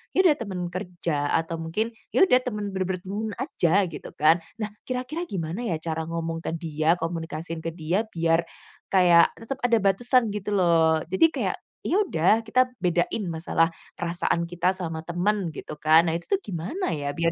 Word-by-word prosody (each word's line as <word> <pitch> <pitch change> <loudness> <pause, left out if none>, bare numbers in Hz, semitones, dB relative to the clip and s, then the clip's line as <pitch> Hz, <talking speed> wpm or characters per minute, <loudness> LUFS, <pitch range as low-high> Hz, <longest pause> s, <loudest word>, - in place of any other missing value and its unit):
iya 375 - +5
ada - - +2
teman 180 -3 -4
kerja, 170 -5 -2
atau 165 0 -1
mungkin 210 +8 -2 0.2
ya - - +7
udah, 255 -9 +5
teman 210 -4 -3
benar-benar 185 -1 -2
teman 210 +3 -3
aja, 230 - 0 0.2
gitu - - -8
kan. 160 +3 +4 0.2
Nah, 215 -3 -4 0.2
kira-kira 260 +7 -3
gimana 185 +6 -3
ya 170 - 0
cara 160 -1 -2
ngomong 165 0 -3
ke 165 - -1
dia, 160 0 +1
komunikasiin 165 -1 -4
ke 165 0 -5
dia, 180 +7 -1
biar 165 -2 +1 0.4
kayak 175 -3 +5
tetep 260 +4 -6
ada 240 -2 +3
batasan 235 +3 +3
gitu 210 0 -2
loh, 165 -3 +3
jadi 190 +13 +5
kayak, 320 - -2 0.3
"Ya 380 - +2
udah, 215 - +3
kita 255 +2 +3
bedain 180 +3 0
masalah 165 0 +1 0.3
perasaan 170 0 0
kita 175 +2 +1
sama 165 -4 -5
teman," 175 +1 0
gitu - - -8
kan. 155 +3 +5
Nah 160 - +1
itu 170 - -5
tuh 395 - +3
gimana 190 - -3
ya, 145 -1 -3
biar 165 +2 0
175 Hz, 175 wpm, -25 LUFS, 165-210 Hz, 0.4 s, ya